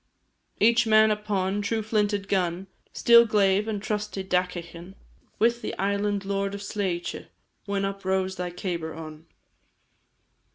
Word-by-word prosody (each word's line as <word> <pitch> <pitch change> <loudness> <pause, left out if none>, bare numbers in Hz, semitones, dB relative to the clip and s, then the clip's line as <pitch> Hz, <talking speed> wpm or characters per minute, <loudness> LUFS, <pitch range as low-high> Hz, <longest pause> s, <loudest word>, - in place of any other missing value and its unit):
Each 235 +1 +4
man 215 0 +5
upon, 205 -2 -1
true 220 +2 -1
flinted 205 -2 0
gun, 180 -1 0 0.3
Steel 235 0 +6
glaive, 205 -2 +2
and 215 -2 -2
trusty 210 -2 -3
dagaichean; 180 -1 -3 0.4
With 235 +2 +2
the - - -5
Island 200 0 -1
Lord 200 0 -2
of 200 - -7
Sleitè, 195 -4 -3 0.4
When 200 -1 -1
up 195 0 -5
rose 190 0 0
thy 180 0 -3
cabar 175 -3 -4
on! 155 0 -10
195 Hz, 130 wpm, -26 LUFS, 185-210 Hz, 0.4 s, Steel